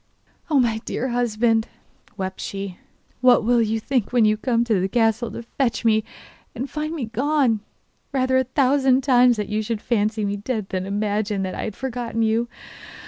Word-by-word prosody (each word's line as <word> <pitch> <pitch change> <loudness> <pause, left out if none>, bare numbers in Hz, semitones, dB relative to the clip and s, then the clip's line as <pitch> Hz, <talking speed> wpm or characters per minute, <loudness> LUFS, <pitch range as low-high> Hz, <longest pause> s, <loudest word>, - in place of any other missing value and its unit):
'Oh, 295 -3 +4
my 230 -3 +1
dear 260 - -3
husband,' 230 -1 +1 0.5
wept 190 -1 -4
she, 195 -2 -5 0.4
'what 250 -2 +5
will 240 +1 +3
you 225 0 0
think 245 -1 -1
when 240 -3 +4
you 215 0 +4
come 235 +1 +1
to 220 -5 +1
the 190 - 0
castle 225 +1 +1
to 235 - -7
fetch 235 0 -2
me 220 -1 +3 0.5
and 255 +4 -3
find 305 +3 -4
me 280 -7 -3
gone? 250 0 +1 0.5
Rather 260 -1 +2
a - - +2
thousand 265 0 +3
times 250 -3 +5
that 210 -1 -3
you 215 +1 0
should 220 0 -3
fancy 215 -1 0
me 200 0 -2
dead 215 -1 -3
than 185 0 -3
imagine 205 0 -1
that 185 - -3
I - - -4
had 215 - -5
forgotten 240 -3 -3
you! 225 +2 +1
230 Hz, 185 wpm, -22 LUFS, 215-250 Hz, 0.5 s, what